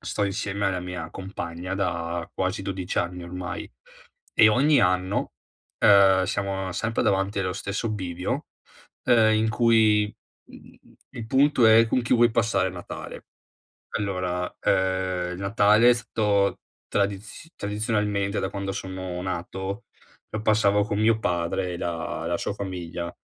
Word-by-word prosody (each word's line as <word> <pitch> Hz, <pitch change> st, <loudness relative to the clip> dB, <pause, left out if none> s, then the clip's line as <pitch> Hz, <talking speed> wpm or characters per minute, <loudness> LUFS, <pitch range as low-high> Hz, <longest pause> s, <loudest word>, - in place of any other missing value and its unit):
sto 100 Hz, -, -2 dB
insieme 100 Hz, +1 st, -2 dB
alla 90 Hz, -2 st, -1 dB
mia 90 Hz, -3 st, -6 dB
compagna 95 Hz, -1 st, -6 dB
da 85 Hz, -3 st, -2 dB
quasi 95 Hz, +1 st, -2 dB
12 95 Hz, -2 st, -4 dB
anni 90 Hz, +1 st, -1 dB
ormai, 90 Hz, +1 st, -6 dB, 0.6 s
e 110 Hz, -, +7 dB
ogni 140 Hz, +7 st, +4 dB
anno, 90 Hz, +2 st, 0 dB, 0.4 s
ehm, 95 Hz, -2 st, +6 dB
siamo 95 Hz, -1 st, -2 dB
sempre 115 Hz, +5 st, -1 dB
davanti 95 Hz, +1 st, +1 dB
allo 90 Hz, -1 st, -1 dB
stesso 100 Hz, +4 st, -3 dB
bivio, 90 Hz, -3 st, -3 dB, 0.6 s
ehm, 110 Hz, -2 st, +5 dB
in 110 Hz, +1 st, +2 dB
cui, 110 Hz, -2 st, +3 dB, 0.4 s
mhmm, -, -, -12 dB, 0.5 s
i -, -, -17 dB
il 110 Hz, -, -5 dB
punto 135 Hz, -2 st, +4 dB
è 110 Hz, +1 st, +7 dB
con 125 Hz, +2 st, +1 dB
chi 120 Hz, -, -1 dB
vuoi 120 Hz, 0 st, +5 dB
passare 115 Hz, -5 st, +1 dB
Natale. 90 Hz, -1 st, -8 dB, 0.7 s
Allora, 90 Hz, -3 st, -2 dB
ehm, 95 Hz, -1 st, 0 dB
il 90 Hz, -, -7 dB
Natale 105 Hz, +3 st, +4 dB
ehm 125 Hz, -, +9 dB
è -, -, +1 dB
stato 105 Hz, -4 st, 0 dB, 0.3 s
tradiz 100 Hz, +9 st, -3 dB
tradizionalmente, 105 Hz, -1 st, -1 dB
da -, -, -2 dB
quando 100 Hz, 0 st, -4 dB
sono 95 Hz, -2 st, -5 dB
nato, 95 Hz, +4 st, -4 dB, 0.5 s
lo 110 Hz, -, -4 dB
passavo 105 Hz, -2 st, +3 dB
con 105 Hz, 0 st, -2 dB
mio 110 Hz, +1 st, +3 dB
padre 90 Hz, +1 st, -1 dB
e -, -, -6 dB
la 85 Hz, -1 st, -4 dB
la -, -, 0 dB
sua -, -, -2 dB
famiglia, 90 Hz, -3 st, -5 dB
100 Hz, 145 wpm, -25 LUFS, 90-105 Hz, 0.7 s, ehm